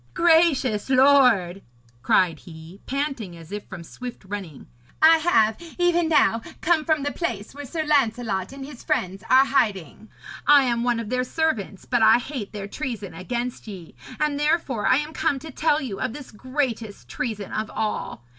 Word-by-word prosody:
'Gracious 320 Hz, -10 st, +3 dB
lord,' 255 Hz, -9 st, +4 dB, 0.4 s
cried 165 Hz, +4 st, +2 dB
he, 165 Hz, +3 st, -13 dB
panting 270 Hz, -, -3 dB
as 165 Hz, +1 st, -14 dB
if 205 Hz, 0 st, -6 dB
from 185 Hz, -3 st, -9 dB
swift 245 Hz, +5 st, -9 dB
running, 190 Hz, -7 st, -7 dB, 0.3 s
'I 325 Hz, +1 st, +7 dB
have 315 Hz, 0 st, +1 dB
even 345 Hz, -2 st, +2 dB
now 230 Hz, -7 st, +3 dB, 0.2 s
come 325 Hz, -2 st, +2 dB
from 310 Hz, -2 st, +1 dB
the 290 Hz, -, -1 dB
place 225 Hz, -, -4 dB
where 290 Hz, +1 st, -8 dB
Sir 320 Hz, +4 st, -3 dB
Lancelot 235 Hz, -9 st, 0 dB
and 270 Hz, 0 st, -8 dB
his 275 Hz, -4 st, -11 dB
friends 190 Hz, +2 st, -2 dB
are 265 Hz, +1 st, +6 dB
hiding. 220 Hz, -, -1 dB, 0.4 s
I 290 Hz, -1 st, +7 dB
am 235 Hz, -2 st, 0 dB
one 240 Hz, -1 st, +1 dB
of 230 Hz, 0 st, -6 dB
their 250 Hz, 0 st, +1 dB
servants, 250 Hz, -, -2 dB
but 245 Hz, -2 st, 0 dB
I 220 Hz, +1 st, +7 dB
hate 245 Hz, -4 st, -6 dB
their 200 Hz, -2 st, -6 dB
treason 225 Hz, -, -5 dB
against 235 Hz, +8 st, -5 dB
ye, 185 Hz, -6 st, -9 dB, 0.3 s
and 300 Hz, -2 st, 0 dB
therefore 295 Hz, -7 st, 0 dB
I -, -, +5 dB
am 300 Hz, +2 st, -4 dB
come 285 Hz, -, 0 dB
to 315 Hz, +3 st, -9 dB
tell 305 Hz, +2 st, +1 dB
you 230 Hz, -9 st, -5 dB
of 255 Hz, -3 st, -2 dB
this 290 Hz, -1 st, -10 dB
greatest 235 Hz, -3 st, -4 dB
treason 220 Hz, -5 st, -4 dB
of 215 Hz, 0 st, -3 dB
all. 210 Hz, -, -4 dB
245 Hz, 175 wpm, -24 LUFS, 205-290 Hz, 0.4 s, I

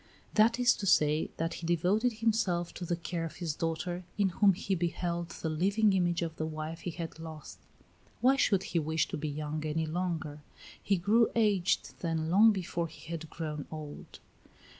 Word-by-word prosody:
That 230 Hz, +3 st, +4 dB
is 245 Hz, 0 st, +5 dB
to 200 Hz, -, -3 dB
say, 150 Hz, -3 st, +3 dB
that 165 Hz, +1 st, -1 dB
he 165 Hz, -, -4 dB
devoted 190 Hz, +8 st, +2 dB
himself 215 Hz, -6 st, 0 dB
to 180 Hz, -, -6 dB
the 175 Hz, -, 0 dB
care 170 Hz, 0 st, -4 dB
of 165 Hz, -, -5 dB
his 170 Hz, -4 st, -3 dB
daughter, 170 Hz, +3 st, -3 dB
in 200 Hz, -2 st, +3 dB
whom 195 Hz, +2 st, +4 dB
he 195 Hz, +1 st, -2 dB
beheld 170 Hz, -1 st, -2 dB
the 165 Hz, -, -5 dB
living 200 Hz, +6 st, +2 dB
image 175 Hz, -2 st, +1 dB
of 160 Hz, -1 st, -5 dB
the 155 Hz, -, -1 dB
wife 155 Hz, +1 st, -5 dB
he -, -, -4 dB
had 165 Hz, -1 st, -6 dB
lost. 160 Hz, -2 st, -9 dB, 0.6 s
Why 260 Hz, +2 st, +5 dB
should 195 Hz, -8 st, +2 dB
he 170 Hz, -, -1 dB
wish 160 Hz, 0 st, 0 dB
to -, -, -3 dB
be 150 Hz, 0 st, -3 dB
young 150 Hz, +1 st, -4 dB
any 155 Hz, +1 st, -1 dB
longer? 160 Hz, -3 st, -3 dB, 0.4 s
He 200 Hz, -, +1 dB
grew 215 Hz, +6 st, +3 dB
aged 205 Hz, -5 st, +1 dB
then 165 Hz, -1 st, -1 dB
long 215 Hz, +5 st, +7 dB
before 175 Hz, -4 st, -2 dB
he 160 Hz, +1 st, -12 dB
had 160 Hz, -1 st, -5 dB
grown 150 Hz, -3 st, -5 dB
old. 155 Hz, -2 st, -8 dB
170 Hz, 185 wpm, -31 LUFS, 160-195 Hz, 0.6 s, long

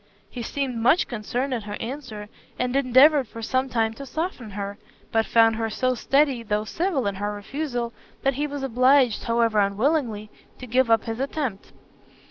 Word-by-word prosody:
He 245 Hz, -, -6 dB
seemed 260 Hz, +1 st, -3 dB
much 280 Hz, +10 st, +4 dB
concerned 245 Hz, +4 st, -3 dB
at 225 Hz, -4 st, -3 dB
her 205 Hz, 0 st, -5 dB
answer, 230 Hz, -4 st, -6 dB, 0.3 s
and 250 Hz, +1 st, -1 dB
endeavoured 275 Hz, +1 st, +5 dB
for 230 Hz, +2 st, -9 dB
some 260 Hz, +3 st, 0 dB
time 225 Hz, -2 st, 0 dB
to 275 Hz, +5 st, -9 dB
soften 315 Hz, -, -4 dB
her, 200 Hz, +1 st, -6 dB, 0.3 s
but 225 Hz, -1 st, +1 dB
found 225 Hz, -1 st, +4 dB
her 225 Hz, -1 st, -1 dB
so 255 Hz, +4 st, 0 dB
steady, 275 Hz, +1 st, +2 dB
though 210 Hz, -1 st, -1 dB
civil 325 Hz, -, -1 dB
in 200 Hz, -, 0 dB
her 205 Hz, 0 st, -1 dB
refusal, 240 Hz, +2 st, -4 dB, 0.3 s
that 275 Hz, -, +2 dB
he 290 Hz, +3 st, -2 dB
was 285 Hz, -1 st, -5 dB
obliged, 255 Hz, -1 st, +3 dB
however 230 Hz, -2 st, +2 dB
unwillingly, 215 Hz, +1 st, 0 dB, 0.3 s
to 255 Hz, -, -8 dB
give 250 Hz, 0 st, +2 dB
up 225 Hz, -1 st, +4 dB
his 225 Hz, +1 st, -5 dB
attempt. 270 Hz, -7 st, -3 dB
245 Hz, 175 wpm, -24 LUFS, 220-275 Hz, 0.3 s, endeavoured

